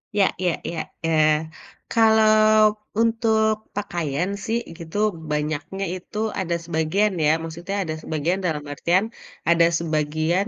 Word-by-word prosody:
Ya 200 -2 +4
ya 180 -1 +1 0.2
ya. 165 - -4 0.3
Eee, 155 -1 +4 0.6
kalau 220 -1 +5 0.7
untuk 225 -1 +2 0.2
pakaian 175 -4 -2 0.2
sih 225 +1 0 0.2
gitu 165 +3 -7 0.3
banyaknya 150 +5 -2
itu 185 +3 -9 0.2
ada 175 -2 -1
sebagian 170 +6 +1
ya, 150 - +4
maksudnya 170 +4 -5
ada 155 -2 -4
sebagian 160 +5 -1
dalam 150 -4 -1
artian 180 +7 +1 0.4
ada 170 0 +5
sebagian 160 +4 0
170 Hz, 120 wpm, -23 LUFS, 155-205 Hz, 0.7 s, kalau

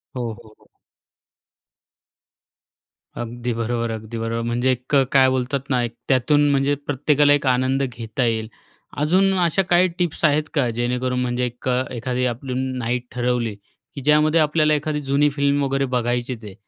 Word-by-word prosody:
हो 125 - -3 0.2
हो 110 -1 -18
हो. - - -28 2.5
अगदी 120 +1 -4
बरोबर, 115 0 -2
अगदी 110 +1 -6
बरोबर. 115 +1 -2
म्हणजे 120 +2 +1
एक 125 +3 -2 0.2
काय 135 -1 +5
बोलतात 130 +2 -2
ना, 125 -3 +2
एक 120 -1 -4
त्यातून 145 +3 +3
म्हणजे 140 +1 +2
प्रत्येकाला 145 +1 +3
एक 145 -1 0
आनंद 130 +2 +2
घेता 120 -1 -3
येईल. 110 -1 -1 0.5
अजून 190 +6 +3
अशा 175 +2 +2
काही 180 +1 +5
टिप्स 170 -2 -2
आहेत 150 0 +3
का, 140 -6 +1
जेणेकरून 125 +2 -1
म्हणजे 125 0 -1
एक 125 +1 -7
अ, 125 0 +1
एखादी 125 +1 -2
आपली 125 +2 -3 0.2
नाईट 125 0 -2
ठरवली 120 -3 -1 0.4
की 140 - -6
ज्यामध्ये 150 +3 +3
आपल्याला 155 0 +2
एखादी 150 0 -1
जुनी 140 +1 +2
फिल्म 140 0 +1
वगैरे 135 0 0
बघायचीच 120 0 -2
आहे. 100 - -9
130 Hz, 155 wpm, -21 LUFS, 120-145 Hz, 2.5 s, काय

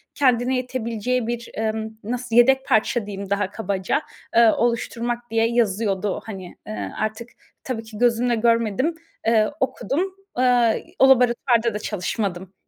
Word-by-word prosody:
kendine 255 -2 +2
yetebileceği 250 -1 -2
bir, 235 -1 -4
emm, 220 0 -2
nasıl 245 +1 -3
yedek 265 +3 +5
parça 220 +1 +2
diyeyim 200 -1 -6
daha 200 -1 0
kabaca, 200 +3 -1 0.3
eee, 230 -1 +7
oluşturmak 240 0 -1
diye 225 0 +3
yazıyordu, 210 -4 0
hani, 190 -5 -8
eee, 215 - -5
artık 215 +2 -3 0.3
tabii 235 -4 -4
ki 220 -1 -11
gözümle 240 +1 +2
görmedim, 230 - +1 0.3
eee, 220 -2 +4
okudum. 335 +7 -1 0.2
Eee, 245 -2 +3
o 265 - +7
laboratuvarda 240 -2 +3
da 210 - -3
çalışmadım. 195 -2 -3
230 Hz, 135 wpm, -23 LUFS, 215-245 Hz, 0.3 s, eee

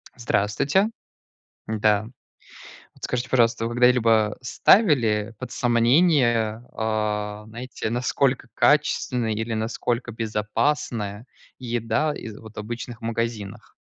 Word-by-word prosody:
Здравствуйте. 120 - +1 0.8
Да. 105 -1 +2 0.9
Вот - - -11
скажите, 125 0 -2
пожалуйста, 115 -2 +2
вы 120 - -4
когда-либо 115 -3 +3
ставили 120 - +3
под - - -7
сомнение, 120 -3 +3
а, 105 -1 -2
знаете, 120 +2 -6
насколько 125 +2 0
качественная 125 -5 +2
или 110 +2 -2
насколько 115 +2 -2
безопасная 110 0 -2 0.3
еда 120 +5 -1
из 110 -6 -8
вот 110 0 -12
обычных 120 +2 -6
магазинах? 115 -2 -4
115 Hz, 95 wpm, -24 LUFS, 110-125 Hz, 0.9 s, когда-либо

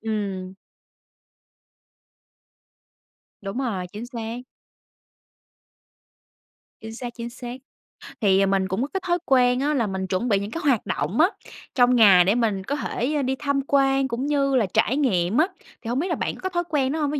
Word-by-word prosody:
ừm. 200 -4 -4 2.9
Đúng 195 +5 -5
rồi, 215 -9 -2
chính 220 +4 -6
xác. 235 -1 -6 2.4
Chính 220 0 -8
xác, 240 0 -7
chính 235 -1 -6
xác. 245 0 -7 0.7
Thì 195 -1 +4
mình 195 -1 +1
cũng 190 +6 -2
có 275 - 0
cái 385 - -2
thói 350 0 +2
quen 250 -1 +3
á 295 +2 +1
là 235 -6 +1
mình 190 -1 -3
chuẩn 190 +7 -1
bị 200 - +3
những 200 +2 -5
cái 330 - -4
hoạt 255 -7 +2
động 150 +10 -2
á 325 - +7 0.5
trong 250 -1 +4
ngày 195 -6 +7
để 200 +5 +3
mình 215 -5 0
có 280 +9 -2
thể 290 0 -2
đi 265 +1 0
tham 280 -1 0
quan 270 -1 +3
cũng 250 +2 -3
như 280 -2 +1
là 240 -4 +3
trải 225 +5 +2
nghiệm 195 -7 +1
á, 320 +4 +4 0.3
thì - - -9
hông 245 +3 0
biết 350 - -1
là 340 - 0
bạn - - -3
có 375 - -4
thói 350 -1 -1
quen 275 -4 +1
đó 320 - -2
hông? 295 -2 0
Ví 295 - -1
245 Hz, 180 wpm, -24 LUFS, 200-275 Hz, 2.9 s, á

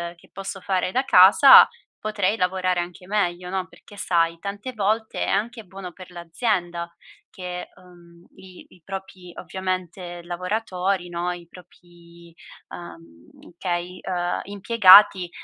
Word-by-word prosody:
che 170 - -23
posso 195 0 -7
fare 185 -1 -1
da 260 - +1
casa, 210 +5 +8 0.3
potrei 210 -1 -1
lavorare 185 -1 0
anche 175 +1 -7
meglio, 180 -3 -2
no, 190 -1 -3
perché 205 +2 -18
sai, 165 -3 0
tante 205 +6 -6
volte 220 +1 -1
è - - -7
anche 225 +3 -2
buono 190 -1 -10
per 185 +1 -14
l'azienda 175 -1 -3 0.4
che, 180 -2 -7
uhm, 175 -1 -19
i 190 -1 -15
i 180 - -21
propri 190 -2 -9
ovviamente, 185 -1 -5
lavoratori, 180 0 -3
no, 175 +1 -3
i 175 -1 -9
propri, 170 -1 -18 0.4
uhm, 85 - -14
okay, 180 0 -4
uhm, 175 -1 -2
impiegati, 200 -3 +5
180 Hz, 130 wpm, -23 LUFS, 175-195 Hz, 0.4 s, casa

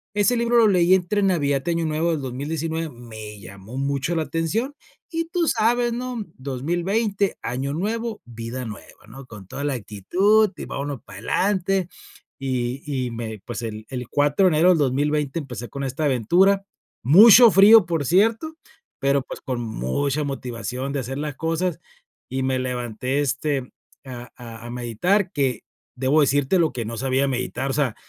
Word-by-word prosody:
Ese 205 +4 +3
libro 235 0 +2
lo 225 -2 +6
leí 180 -2 +4
entre 195 +3 0
Navidad 145 -7 +1
y - - +2
Año 165 -1 0
Nuevo 160 +2 0
del 155 -3 -2
2019. 160 +5 -3
Me 110 -4 -10
llamó 100 +6 -10
mucho 140 +4 -1
la 160 - +1
atención 210 - -2 0.4
y 330 0 -1
tú 340 -2 0
sabes, 240 +1 +2
¿no? 245 -1 -4 0.2
2020, 175 - -1
Año 135 +3 -3
Nuevo, 220 +6 -3
vida 120 +2 -6
nueva, 110 0 -11
¿no? 135 +3 -11
Con 105 -4 -12
toda 140 - -6
la 145 - 0
actitud 185 - +2
y - - -6
vámonos 140 -3 -5
para 95 -1 -11
adelante. 190 - 0 0.5
Y 130 -1 -2 0.3
y 120 - -6
me 110 -3 -6
pues, 120 0 -5
el 110 -1 -6
el 125 -2 -5
4 145 +6 +2
de - - +5
enero 175 +4 +5
del 170 - +3
2020 145 +2 0
empecé 125 -5 -7
con 140 0 -6
esta 135 +4 -3
aventura. 180 - +3 0.4
Mucho 215 - +9
frío, 205 +1 +8
por 165 -4 -1
cierto, 225 - +2 0.4
pero, 140 0 +2
pues, - - -9
con 130 -2 -3
mucha 120 - -2
motivación 130 0 -4
de 140 - -1
hacer 130 +1 -5
las 150 -2 -4
cosas. 165 +2 -1 0.5
Y 130 +1 -2
me 130 0 0
levanté, 125 +1 -2
este, 140 -2 -1 0.3
a 125 -1 -9
a 115 -2 -10
a - - -8
meditar, 150 - 0
que 135 - -1 0.3
debo 135 +4 +2
decírtelo 145 +4 +2
que 120 -2 -4
no 115 +1 -5
sabía 135 +2 +1
meditar. 130 +1 -2
O - - -3
sea, 135 -6 0
140 Hz, 170 wpm, -23 LUFS, 125-185 Hz, 0.5 s, Mucho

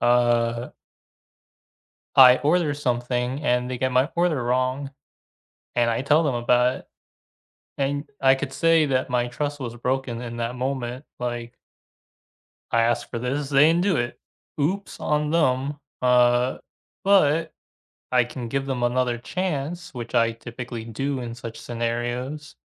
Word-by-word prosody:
uh 120 0 +2 1.5
I 130 -1 +9
order 155 0 +2
something 125 -1 -1
and 125 -2 +1
they 125 - -3
get 130 0 0
my 130 +5 +3
order, 155 -9 +1 1.2
and 120 -1 +2
I 115 +2 -1
tell 150 +4 +4
them 145 -5 0
about 125 +1 +2
it - - -21 0.9
and 145 +1 -1 0.2
I 135 0 +6
could 135 0 -5
say 165 0 +4
that 130 -2 0
my 120 -1 0
trust 145 +4 -3
was 120 -4 -5
broken 125 -1 -2
in 120 -1 -6
that 120 +1 -3
moment, 130 0 -3
like 120 0 -4 1.2
asked 115 0 +1
for 120 - -3
this, 135 +4 -2
they 140 +1 +6
didn't 170 +2 +2
do 190 -3 +2
it. 120 0 -2 0.4
Oops 195 +7 -2
on 150 0 0
them. 145 -3 +1 0.3
Uh, 125 0 +3 0.5
but 165 -5 +3 0.6
I 125 -1 +4
can 120 -1 -7
give 135 +2 -2
them 130 -3 -2
another 120 0 +1
chance, 170 +2 -3
which 120 -1 -7
I 115 -1 +3
typically 120 0 -7
do 135 +4 -3
in 120 -1 -5
such 115 -1 -8
scenarios 120 +6 -3
125 Hz, 140 wpm, -24 LUFS, 120-145 Hz, 1.5 s, I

